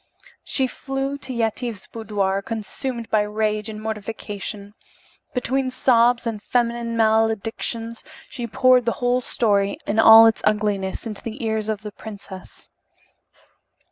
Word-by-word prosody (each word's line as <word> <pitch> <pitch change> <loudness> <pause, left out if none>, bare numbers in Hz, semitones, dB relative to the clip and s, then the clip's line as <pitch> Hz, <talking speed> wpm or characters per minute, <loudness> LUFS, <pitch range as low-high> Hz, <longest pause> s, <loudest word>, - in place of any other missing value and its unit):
She 265 - 0
flew 270 +2 -4
to 265 - -8
Yetive's 230 -2 -2
boudoir, 200 -3 -2
consumed 230 +3 -5
by 215 - +4
rage 215 +1 -1
and 215 -1 -6
mortification. 210 -1 -5 0.6
Between 260 +1 0
sobs 240 -1 +3
and 220 -3 -3
feminine 235 -1 -1
maledictions 225 +1 0 0.2
she 240 -4 -6
poured 255 +1 +4
the 235 - +1
whole 245 0 +1
story, 200 -5 +1
in 210 +2 0
all 225 0 +10
its 225 0 +3
ugliness, 205 -2 0
into 215 -3 -6
the 230 +2 -6
ears 220 -1 -1
of 215 -1 -3
the 210 - -6
princess. 200 -3 -11
225 Hz, 130 wpm, -22 LUFS, 210-240 Hz, 0.6 s, all